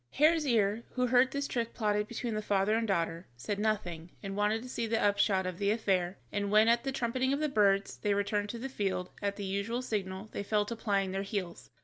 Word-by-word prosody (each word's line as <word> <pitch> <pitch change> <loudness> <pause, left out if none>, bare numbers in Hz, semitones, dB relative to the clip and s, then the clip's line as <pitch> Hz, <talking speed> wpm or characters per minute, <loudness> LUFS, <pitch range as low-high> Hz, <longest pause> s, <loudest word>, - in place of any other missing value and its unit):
Hare's 310 +1 +4
ear, 220 -2 +2
who 250 -1 +1
heard 250 +1 +4
this 280 +1 -2
trick 235 -2 -2
plotted 210 -2 0
between 235 0 -4
the 215 - -1
father 200 0 +1
and 225 0 +1
daughter, 170 -2 -1
said 195 +12 -3
nothing, 180 -6 -1
and 195 -1 -4
wanted 210 +2 +1
to - - -8
see 235 -2 -2
the 225 0 +1
upshot 200 -2 +2
of 185 0 -4
the 200 0 +1
affair, 190 -4 +1
and 200 0 -1
when, 215 +2 +5
at 235 0 +4
the 270 - -1
trumpeting 260 +1 0
of 280 - 0
the 305 - +1
birds, 200 -6 +2
they 205 -1 0
returned 205 0 0
to 235 - -4
the 250 +3 -4
field, 195 -7 -2
at 200 -1 -1
the 200 - -5
usual 200 +6 -2
signal 200 -3 -3
they - - -4
fell 210 +1 +1
to 235 - -4
plying 200 -4 0
their 195 +1 -2
heels. 195 -4 -4
210 Hz, 235 wpm, -31 LUFS, 195-235 Hz, -, when